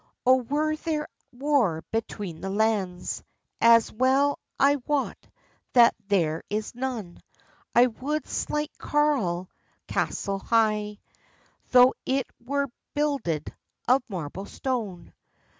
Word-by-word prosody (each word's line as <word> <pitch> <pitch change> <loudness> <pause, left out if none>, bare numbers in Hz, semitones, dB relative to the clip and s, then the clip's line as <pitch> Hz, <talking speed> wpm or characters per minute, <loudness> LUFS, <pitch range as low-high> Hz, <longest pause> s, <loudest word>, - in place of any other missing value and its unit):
"O 255 +1 +7
were 295 +5 0
there 310 -1 -2 0.2
war 245 - +1
between 205 -6 -4
the 195 - -3
lands, 200 -3 -1 0.4
As 230 -1 +6
well 265 +5 +2 0.2
I 285 +1 +5
wot 290 -2 -1 0.5
that 235 -2 +7
there 165 -6 +1
is 210 +1 -3
none, 240 -8 -4 0.6
I 240 - +8
would 280 +6 -3
slight 300 +1 -2
Carlisle 245 -13 +1 0.4
castell 195 0 -1
high, 210 -1 +1 0.7
Tho 250 0 +7
it 265 -1 0 0.2
were 280 +2 -1 0.3
builded 275 - -1 0.3
of 255 +2 +5
marble 185 +1 -5
stone. 215 -10 -4
235 Hz, 110 wpm, -26 LUFS, 200-280 Hz, 0.7 s, I